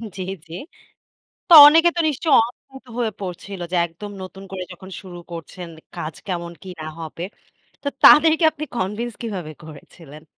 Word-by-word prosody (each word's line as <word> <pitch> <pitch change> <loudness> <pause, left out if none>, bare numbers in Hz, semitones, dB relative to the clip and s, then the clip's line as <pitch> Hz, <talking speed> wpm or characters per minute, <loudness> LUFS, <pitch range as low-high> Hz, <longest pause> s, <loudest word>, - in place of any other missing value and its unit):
জি, 190 - -6 0.3
জি। 165 - -11 0.9
তো 345 - +5
অনেকে 330 +3 +6
তো - - -2
নিশ্চয়ই 300 +1 0
অদ্ভুত 265 +2 -15
হয়ে 235 -3 -1
পড়ছিল 190 0 -7
যে - - -1
একদম 175 +5 -10
নতুন 190 +1 -11
করে 185 -1 -5
যখন 190 +2 -12
শুরু 180 -2 -10
করছেন, 170 +1 -8 0.3
কাজ 155 0 -6
কেমন 170 -2 -4
কি 190 - -9
না - - -6
হবে। 165 +1 -7 0.6
তো 285 - -2
তাদেরকে 320 +2 +7
আপনি 305 0 -6
কনভিন্স 225 +5 -3
কিভাবে 185 -9 -5
করেছিলেন? 155 0 -14
190 Hz, 155 wpm, -21 LUFS, 170-245 Hz, 0.9 s, তাদেরকে